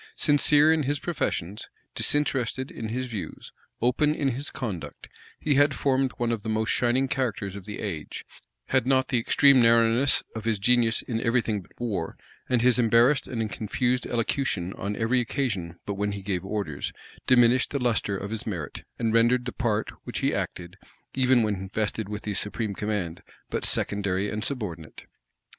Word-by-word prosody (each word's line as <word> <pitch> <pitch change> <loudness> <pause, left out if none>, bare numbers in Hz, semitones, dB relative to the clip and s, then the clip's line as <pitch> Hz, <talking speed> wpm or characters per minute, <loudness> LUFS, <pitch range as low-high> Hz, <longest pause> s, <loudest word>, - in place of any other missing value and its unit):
Sincere 150 +1 +5
in 160 - +1
his 145 +1 0
professions, 105 - -3 0.2
disinterested 130 -3 0
in 110 - -6
his 130 +3 -2
views, 105 -10 -7 0.3
open 150 +5 +3
in 140 -3 0
his 135 +4 -3
conduct, 105 -10 -6 0.3
he 150 - +1
had 140 0 +4
formed 130 +2 +1
one 120 -1 0
of 115 -3 -2
the 110 - -5
most 110 -1 0
shining 125 +2 +2
characters 110 -8 -2
of 100 -2 -9
the 105 - -6
age, 85 -8 -5 0.4
had 120 - +2
not 130 -1 +2
the 125 - +2
extreme 135 +3 +5
narrowness 115 +3 +4
of 110 - -5
his 115 -2 +1
genius 115 +2 +2
in 115 -2 -3
every 120 +1 +2
thing 110 -3 -2
but 90 - -20
in 120 - -2
war, 95 -8 -3 0.3
and 120 -2 +2
his 125 0 +4
embarrassed 120 +4 +4
and 115 -4 -3
confused 125 +3 -1
elocution 115 -6 -1
on 100 +2 -4
every 120 +3 +1
occasion 110 - -2
but 100 - -2
when 100 +1 -2
he 100 -1 -7
gave 95 -2 -2
orders, 95 -8 -3 0.4
diminished 125 0 +4
the 145 - -2
lustre 115 -6 0
of 100 +2 -6
his 110 0 -4
merit, 85 -9 -5
and 115 -2 0
rendered 120 +2 +3
the 125 - -3
part 110 -4 -1
which - - -5
he - - +1
acted, 90 +1 -4 0.4
even 130 -2 +3
when 95 -3 -2
vested 105 0 -2
with 105 -1 -5
the 105 - -3
supreme 105 +2 -2
command, 100 -5 -3 0.3
but - - -2
secondary 100 -1 +1
and 105 0 -3
subordinate. 100 - -5
115 Hz, 180 wpm, -26 LUFS, 100-130 Hz, 0.4 s, Sincere